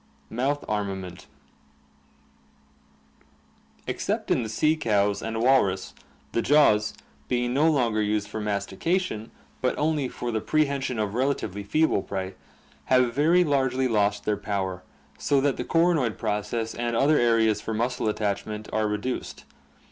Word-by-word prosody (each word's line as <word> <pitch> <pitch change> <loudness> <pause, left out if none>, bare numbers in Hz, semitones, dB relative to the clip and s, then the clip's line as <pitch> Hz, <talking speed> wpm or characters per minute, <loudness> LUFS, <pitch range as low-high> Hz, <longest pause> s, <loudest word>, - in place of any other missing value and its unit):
Mouth 135 +5 -1
Armament 95 -4 -4
— - - -34 2.3
Except - - -2
in - - +3
the 110 - -4
sea 155 +8 +2
cows 105 -7 +1
and 115 0 -3
walrus 100 -8 +2 0.4
the 115 - 0
jaws, 115 -8 +4 0.3
being 120 0 0
no 150 +4 +4
longer 120 -7 +1
used 105 0 0
for 110 - -5
mastication, 105 - -2 0.3
but 130 - 0
only 150 -3 +1
for 120 - -4
the 110 -1 -1
pre 155 +5 +2
hension 135 -3 -3
of 105 -2 -1
relatively 120 -6 -1
feeble 155 +4 +1
prey, 95 0 -4 0.5
have 125 -2 +3
very 165 +6 +4
largely 130 -4 +1
lost 105 -3 +1
their 105 -1 +1
power, 95 -3 -3 0.4
so 140 - +2
that 140 0 +1
the - - -2
coronoid 165 - +2
process 110 +1 -2
and 120 0 -2
other 145 +5 +4
areas 115 -2 +3
for 110 - -4
muscle 120 0 0
attachment 105 0 -3
are 110 0 +1
reduced. 105 +5 -4
115 Hz, 140 wpm, -26 LUFS, 105-135 Hz, 2.3 s, jaws